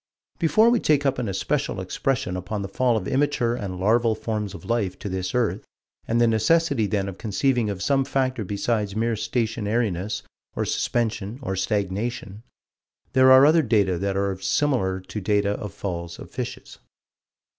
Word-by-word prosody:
Before 215 +8 +4
we 240 - +3
take 145 -5 +2
up 135 -2 +1
an 115 -4 -2
especial 95 - -1
expression 130 -9 -2
upon 100 +3 -4
the - - -4
fall 120 +4 +1
of 100 - -4
immature 135 -4 +1
and 95 -6 -5
larval 110 +3 +3
forms 105 -3 -3
of 80 - -11
life 105 -6 -1
to - - -7
this 95 +1 -3
earth, 120 -3 0 0.4
and 115 +1 +1
the 120 - +5
necessity 115 +2 +2
then 100 -1 -1
of 95 -1 -7
conceiving 120 +1 0
of 95 -1 -4
some 135 +2 +2
factor 130 -3 -1
besides 105 +1 -1
mere 115 +1 +1
stationariness 110 -4 -1 0.3
or - - -1
suspension 110 -2 -1
or 95 -6 -2
stagnation, 100 +2 -2 0.7
there 130 0 +6
are 130 +1 +9
other 160 +2 +5
data 100 - +1
that 100 0 -1
are 100 -1 -1
similar 95 -6 0
to 105 +3 -6
data 100 +1 +1
of 105 -1 -4
falls 85 -4 -5
of - - -11
fishes. - - -6
110 Hz, 165 wpm, -24 LUFS, 100-125 Hz, 0.7 s, are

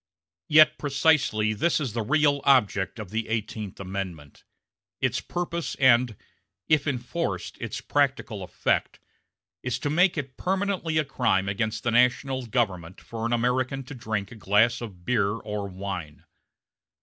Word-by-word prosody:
Yet 155 0 +6
precisely 140 -7 +2
this 160 +12 +1
is 135 -8 -3
the 115 - -1
real 145 +4 +2
object 105 -7 +3
of 105 -4 -7
the 110 0 -2
Eighteenth 110 -2 -4
Amendment; 95 -6 -6 0.6
its - - 0
purpose 170 -1 -3
and, 125 -3 +4 0.5
if 155 -1 +3
enforced, 140 +6 -3
its - - -4
practical - - 0
effect - - -1 0.6
is 125 0 -2
to 145 +3 -2
make 175 +3 +3
it 135 -3 -5
permanently 190 -4 -1
a 155 - +2
crime 95 -8 +1
against 110 +2 -2
the 120 - +1
national 125 +1 +2
government 95 -7 -1
for 115 0 -4
an - - -4
American 130 +3 0
to 130 - -9
drink 110 -5 -3
a - - -9
glass 110 +3 +2
of 95 -7 -9
beer 105 -5 +2
or 105 -2 -4
wine. 90 -6 -6
120 Hz, 145 wpm, -26 LUFS, 105-140 Hz, 0.6 s, Yet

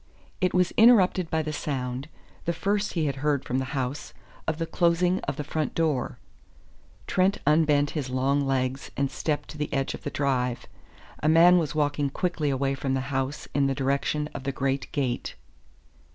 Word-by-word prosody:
It 185 -1 +2
was 180 -1 +3
interrupted 195 -7 +5
by 160 0 0
the 155 0 -4
sound 130 -1 -3 0.4
the 170 - 0
first 200 +5 -1
he 165 -3 0
had 140 -2 -2
heard 145 -1 0
from 130 - -1
the 130 - -2
house 130 +3 -4 0.3
of 160 -1 0
the 165 - -1
closing 175 +2 +2
of - - -2
the 150 - -4
front 150 +1 -3
door. 155 -6 0 0.9
Trent 190 +2 +2
unbent 150 -1 +3
his 145 -5 -3
long 135 +2 +1
legs 135 0 -1
and 140 -1 0
stepped 150 -2 -2
to 155 - -9
the 150 - -2
edge 135 -2 -1
of - - -8
the - - -4
drive. 125 -4 -1 0.6
A 150 - +2
man 175 +3 +7
was 155 -3 -2
walking 145 -1 +1
quickly 165 -1 -1
away 135 0 0
from 135 -1 -1
the 130 - 0
house 135 +2 -2
in 140 -1 +2
the 135 - 0
direction 140 +2 0
of - - -6
the 140 - -1
great 135 0 -2
gate. 130 -4 -2
145 Hz, 185 wpm, -26 LUFS, 135-165 Hz, 0.9 s, man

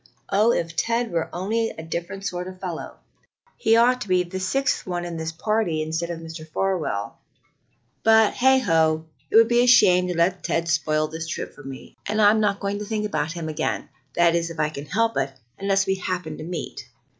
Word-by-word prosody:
Oh, 210 +4 +4
if 165 -7 -2
Ted 230 +5 0
were 165 -1 -1
only 225 +5 -1
a 160 - -8
different 170 +4 -5
sort 180 -1 -3
of 185 0 -9
fellow! 180 -4 -6 0.6
He 220 +1 +3
ought 250 +2 +4
to 210 - -4
be 180 -1 +3
the 180 +2 -6
sixth 255 +9 0
one 175 -1 -2
in 170 -1 -5
this 160 0 -3
party 175 -3 0
instead 165 +2 -3
of 170 -1 -4
Mr. 160 0 -8
Farwell. 160 - -2 0.8
But, 220 -1 +5
heigho! 165 -12 +3 0.2
it - - -3
would 225 0 +8
be 240 +1 +4
a 245 - +3
shame 180 -7 +6
to 180 -2 -3
let 180 +2 +1
Ted 170 0 -1
spoil 155 -2 +1
this 160 +1 -6
trip - - -5
for - - -14
me, 135 -1 -10
and 215 +1 -1
I'm 210 +1 +6
not 205 -2 +1
going 200 +1 -2
to 210 - -5
think 210 -1 -3
of 155 0 0
him 170 -3 -5
again 155 0 -2 0.3
that 170 -1 +4
is, 170 0 0
if 165 -1 -9
I 155 0 +2
can 145 -1 -8
help 225 +7 +1
it 135 - -1 0.3
unless 195 0 +2
we 190 - +1
happen 180 -4 -4
to - - -6
meet." 170 0 -6
180 Hz, 210 wpm, -24 LUFS, 160-210 Hz, 0.8 s, would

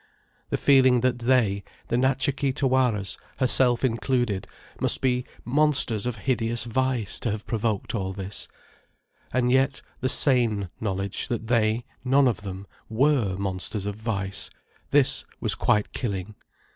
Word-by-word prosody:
the - - 0
feeling 130 -3 +5
that 125 0 +1
they, 115 -5 +2 0.3
the 120 - +1
Natcha 135 +3 +2
Kee 140 -2 0
Tawaras, 130 -7 0 0.2
herself 125 -1 +4
included, 120 -4 0 0.3
must - - +2
be 125 -1 0 0.2
monsters 130 -5 +1
of 125 - -2
hideous 115 0 -1
vice, 120 -2 0
to 115 - -1
have 105 0 -4
provoked 110 -2 -2
all 95 -4 -2
this: 95 +1 -4 0.8
and 125 0 +1
yet 135 +2 +2 0.2
the 130 - 0
sane 115 - +3
knowledge 100 -2 -2
that 115 -2 -3
they, 115 0 +1 0.2
none 135 +1 +4
of 115 -5 -1
them, 95 -1 -7 0.2
were 115 -5 +2
monsters 95 +1 -4
of 105 -1 -3
vice; 100 -3 -3 0.4
this 140 -2 +3 0.2
was - - +1
quite 105 -1 +1
killing. 100 -3 -4
120 Hz, 140 wpm, -25 LUFS, 100-130 Hz, 0.8 s, feeling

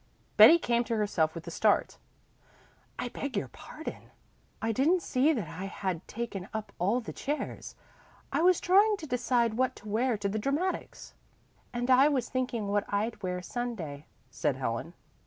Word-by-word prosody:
Betty 335 - +9
came 240 -7 +1
to 230 - -1
herself 175 -7 +1
with 165 - -7
a - - -6
start. - - +1 1.0
"I 245 - -3
beg 270 -2 -4
your 130 - -2
pardon. 310 - -9 0.5
I 225 - 0
didn't 315 - +2
see 270 +4 +3
that 225 - -2
I 185 +5 -6
had 185 -3 -4
taken 215 -5 -5
up 220 -1 -4
all 205 +8 +2
the 225 - -7
chairs. 295 +3 -4 0.6
I - - +1
was 360 0 +5
trying 405 +4 +4
to 325 - -8
decide 245 -3 +1
what 260 0 +1
to 210 - -13
wear 230 +3 +1
to 205 0 -2
the 210 +2 -2
dramatics." 295 - -2 0.6
"And 245 +1 -1
I 260 +3 +7
was 265 -5 0
thinking 250 -4 -2
what 205 0 +1
I'd 215 +3 -1
wear 180 -1 -3
Sunday," 180 - -5 0.2
said - - 0
Helen. - - -3
235 Hz, 170 wpm, -29 LUFS, 200-265 Hz, 1.0 s, Betty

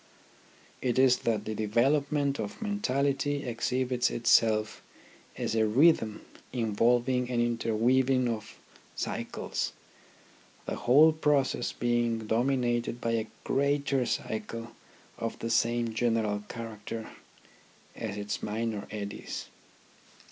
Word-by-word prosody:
It 125 -1 0
is 130 -1 +5
that 105 -2 -1
the 110 - -3
development 140 +6 +1
of 105 -2 -5
mentality 145 - 0
exhibits 125 +1 0
itself 110 -2 +2 0.6
as - - -2
a 110 -1 +3
rhythm 110 -3 +3 0.3
involving 120 +2 +1
an 120 -1 0
interweaving 120 +2 +2
of 110 -2 -4 0.4
cycles, - - -3 0.9
the - - -3
whole 145 +6 +6
process 145 -5 +1
being 120 -2 0
dominated 120 0 0
by 115 - -1
a 110 -1 0 0.2
greater 140 -2 +1
cycle 115 +1 -4 0.5
of 115 0 -3
the 115 - -3
same 115 0 +1
general 110 -3 0
character 115 -1 -6 0.8
as 105 -3 -5
its 105 0 -3
minor 110 -1 -3
eddies. 100 -1 -6
120 Hz, 105 wpm, -29 LUFS, 110-130 Hz, 0.9 s, whole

